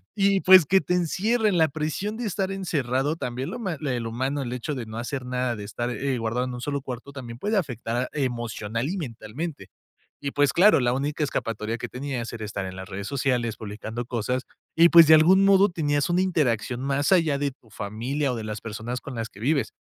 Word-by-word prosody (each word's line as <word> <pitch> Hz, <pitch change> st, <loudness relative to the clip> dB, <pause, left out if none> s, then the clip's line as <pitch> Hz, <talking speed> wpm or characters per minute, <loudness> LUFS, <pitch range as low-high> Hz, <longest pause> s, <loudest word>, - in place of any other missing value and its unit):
Y, 195 Hz, -1 st, +3 dB
pues, 185 Hz, -4 st, +8 dB
que 190 Hz, +5 st, +4 dB
te 165 Hz, +4 st, -1 dB
encierren, 205 Hz, +4 st, +1 dB
la 160 Hz, -1 st, +5 dB
presión 155 Hz, +9 st, -3 dB
de 245 Hz, -, -4 dB
estar 195 Hz, -1 st, -1 dB
encerrado, 145 Hz, -6 st, -1 dB
también 125 Hz, -2 st, -4 dB
lo -, -, -5 dB
ma 190 Hz, -7 st, -2 dB
el 125 Hz, -5 st, -2 dB
humano, 130 Hz, +5 st, -2 dB
el 125 Hz, -1 st, -4 dB
hecho 125 Hz, +4 st, -3 dB
de 125 Hz, -3 st, -5 dB
no 110 Hz, 0 st, -8 dB
hacer 125 Hz, +2 st, -4 dB
nada, 125 Hz, -1 st, -1 dB
de 105 Hz, -, -7 dB
estar, 120 Hz, +4 st, -3 dB
eh, 130 Hz, +2 st, -1 dB
guardado 115 Hz, +3 st, -1 dB
en 125 Hz, -, -5 dB
un 125 Hz, -, -6 dB
solo 140 Hz, +1 st, -2 dB
cuarto, 130 Hz, +1 st, -7 dB
también 120 Hz, -4 st, -8 dB
puede 210 Hz, +6 st, 0 dB
afectar 125 Hz, -, -2 dB
emocional 120 Hz, -3 st, -2 dB
y 195 Hz, -, -2 dB
mentalmente. 140 Hz, -, -6 dB, 0.5 s
Y, 140 Hz, -1 st, -3 dB
pues, 145 Hz, -1 st, +2 dB
claro, 195 Hz, +3 st, +6 dB
la 120 Hz, -1 st, +2 dB
única 145 Hz, +3 st, -1 dB
escapatoria 115 Hz, -4 st, -2 dB
que -, -, -6 dB
tenías 125 Hz, -3 st, -4 dB
era 110 Hz, -2 st, -5 dB
estar 100 Hz, -2 st, -4 dB
en 95 Hz, -, -6 dB
las 95 Hz, 0 st, -7 dB
redes 100 Hz, +1 st, -5 dB
sociales 125 Hz, -5 st, 0 dB
publicando 110 Hz, +3 st, -6 dB
cosas 125 Hz, +2 st, -2 dB, 0.3 s
y, 170 Hz, +1 st, +7 dB
pues, 170 Hz, -2 st, +9 dB
de 160 Hz, -, +8 dB
algún 185 Hz, +5 st, +6 dB
modo 195 Hz, +1 st, +6 dB
tenías 145 Hz, -3 st, 0 dB
una 175 Hz, +1 st, +2 dB
interacción 125 Hz, -, 0 dB
más 140 Hz, +3 st, 0 dB
allá 165 Hz, -6 st, +4 dB
de 140 Hz, -1 st, 0 dB
tu 125 Hz, -3 st, -24 dB
familia 125 Hz, +8 st, -2 dB
o -, -, -3 dB
de 115 Hz, -, -5 dB
las 105 Hz, -1 st, -5 dB
personas 115 Hz, +3 st, -5 dB
con 140 Hz, -, -8 dB
las 115 Hz, -1 st, -4 dB
que 100 Hz, -, -16 dB
vives. 140 Hz, +3 st, 0 dB
135 Hz, 215 wpm, -25 LUFS, 115-160 Hz, 0.5 s, pues